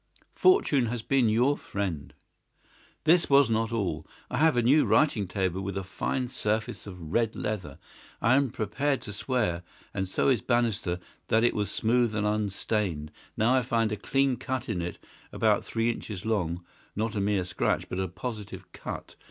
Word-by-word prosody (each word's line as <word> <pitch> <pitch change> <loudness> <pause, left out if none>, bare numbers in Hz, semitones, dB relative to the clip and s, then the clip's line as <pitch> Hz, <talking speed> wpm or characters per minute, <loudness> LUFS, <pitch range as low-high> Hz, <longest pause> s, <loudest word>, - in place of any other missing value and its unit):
"Fortune 155 - +4
has 115 -1 -3
been 130 -3 +3
your 125 +6 +3
friend." 95 - -4 0.9
"This 170 +2 +4
was 140 -4 +5
not 110 +1 +1
all. 90 -9 -2 0.2
I - - -1
have 160 -4 +4
a 120 - +3
new 140 +6 +5
writing 115 -10 +3
table 95 0 -1
with 100 0 -4
a 95 - -2
fine 125 +7 -2
surface 110 -3 -2
of 90 -5 -8
red 115 -2 +1
leather. 105 -4 -4 0.4
I 115 - +3
am 140 0 +3
prepared 135 +7 -1
to 105 - -7
swear, 105 -6 -1 0.3
and 95 -1 -2
so 95 - +1
is 125 -6 +3
Bannister, 115 -7 +1 0.3
that 110 +1 +3
it 120 - +4
was 105 -2 -1
smooth 115 +1 +1
and 105 -1 0
unstained. 100 -6 -1 0.3
Now 115 +4 +3
I 130 - +4
found 115 -3 +1
a - - 0
clean 135 +3 +1
cut 130 -2 -3
in 90 - -2
it 85 +1 -4 0.3
about - - +2
three 115 +1 0
inches 105 -4 -7
long—not 100 +2 -3
a 100 - 0
mere 100 -2 +1
scratch, 90 0 0
but 90 - -4
a 95 - 0
positive 95 -2 -7
cut. - - -7
110 Hz, 175 wpm, -28 LUFS, 95-125 Hz, 0.9 s, was